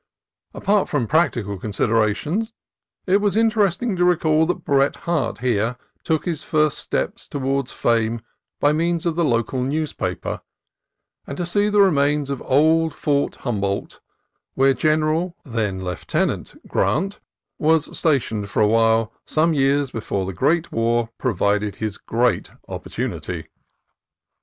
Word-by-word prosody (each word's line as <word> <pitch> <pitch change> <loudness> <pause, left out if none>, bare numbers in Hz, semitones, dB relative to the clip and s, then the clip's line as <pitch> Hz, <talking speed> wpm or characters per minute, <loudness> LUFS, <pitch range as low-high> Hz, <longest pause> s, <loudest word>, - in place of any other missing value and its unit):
Apart 205 -1 +1
from 145 -8 0
practical 120 - +1
considerations, 115 - 0 0.5
it 190 +1 +4
was 205 -1 +1
interesting 220 -1 +2
to 180 - +1
recall 160 -3 +3
that 180 -1 -2
Bret 140 -1 +2
Harte 160 -9 0
here 120 -1 0 0.3
took 160 -2 0
his 170 -5 -2
first 155 -2 +1
steps - - -3
toward 135 -1 -1
fame 115 -1 0 0.4
by 145 - +4
means 170 +2 0
of 170 -2 0
the 170 - +1
local 125 -1 0
newspaper; 150 +4 -2 0.9
and 140 - -6
to 175 - -2
see 205 +4 +1
the 210 -1 +4
remains 145 -5 +2
of 135 - -4
Old 160 +4 +3
Fort 140 -1 0
Hum 110 -5 -1
boldt, 100 0 -3 0.6
where 135 +1 +4
General 155 +5 +1
(then 105 -7 -2
Lieutenant) 90 -1 -2
Grant 195 +6 0 0.4
was 160 0 +2
stationed 115 -10 0
for 105 - +2
a - - +4
time 115 -1 +3 0.2
some 160 +2 +2
years 140 -1 +2
before 100 -3 -3
the 95 - -4
great 155 - +1
war 115 0 +1
provided 105 -3 0
his 110 -2 -4
great 120 0 0 0.2
opportunity. - - -5
140 Hz, 135 wpm, -22 LUFS, 115-165 Hz, 0.9 s, it